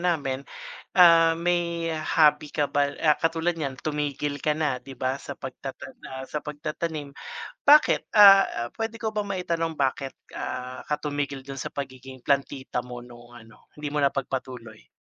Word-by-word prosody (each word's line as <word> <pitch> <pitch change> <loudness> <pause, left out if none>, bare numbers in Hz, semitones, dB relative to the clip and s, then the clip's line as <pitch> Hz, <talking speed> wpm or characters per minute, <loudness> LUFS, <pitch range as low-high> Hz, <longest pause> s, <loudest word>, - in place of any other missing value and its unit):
namin, 135 -2 -4 0.5
ah, 165 -2 +7
may 170 -1 0
hobby 155 -1 +3
ka 145 -1 -1
ba 140 0 +1
ah, 150 -2 +4
katulad 165 +1 +1
niyan 140 -5 -3
tumigil 145 -1 -2
ka 150 +2 0
na, 145 -5 0
di 135 +2 -11
ba 130 +2 -2
sa 140 - -7
pagtatan 130 0 -8
ah, 130 0 -6
sa 150 - -3
pagtatanim. 150 0 -4 0.5
Bakit? 300 +1 +5
Ah, 195 - +7
pwede 225 0 -4
ko 220 -1 -3
ba 210 - 0
maitanong 170 -4 -2
bakit, 135 0 -1 0.2
ah, 125 0 -5
ka 150 0 -1
tumigil 145 -2 -3
dun 135 -1 -7
sa - - -5
pagiging 130 -2 -7
plantita 135 -2 0
mo 125 0 -8
nung 120 0 -14
ano, 110 -2 -18
hindi 150 - -5
mo 150 - +1
napagpatuloy? 130 -5 -3
145 Hz, 155 wpm, -26 LUFS, 130-165 Hz, 0.5 s, ah